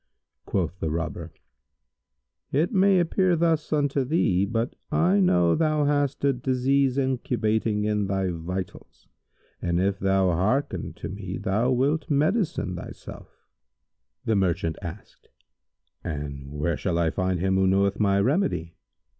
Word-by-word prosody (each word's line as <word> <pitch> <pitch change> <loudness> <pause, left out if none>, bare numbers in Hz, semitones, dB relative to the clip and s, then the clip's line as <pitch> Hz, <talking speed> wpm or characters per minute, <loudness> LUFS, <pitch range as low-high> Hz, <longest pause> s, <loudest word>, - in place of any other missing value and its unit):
Quoth 90 -1 -2
the 80 - -2
Robber, 85 +1 -4 1.2
"It 155 +6 +1
may 195 0 +4
appear 180 +1 +2
thus 160 -2 +1
unto 145 -2 +1
thee; 110 - +1
but 115 +3 -2 0.2
I 185 +4 +3
know 90 - +3
thou 155 -2 +1
hast 145 -1 0
a 140 - +4
disease 130 +1 +1
incubating 115 -5 0
in 105 -2 0
thy 95 -1 -1
vitals 90 +3 -7 0.5
and 85 0 0
if 95 +1 0
thou 95 -1 +2
hearken 110 - -1
to - - -7
me, 95 -2 -6
thou 110 +4 0
wilt 140 +5 +1
medicine 155 - 0
thyself." - - -11 0.8
The 110 - +1
Merchant 85 -4 0
asked, 90 +2 -10 0.7
"And 70 -2 -5
where 75 +3 -1
shall 90 -3 -1
I 85 -2 +1
find 95 -2 -1
him 95 +2 +1
who 95 0 +3
knoweth 100 +1 +2
my 100 -2 +3
remedy?" 100 - 0
105 Hz, 135 wpm, -25 LUFS, 90-140 Hz, 1.2 s, may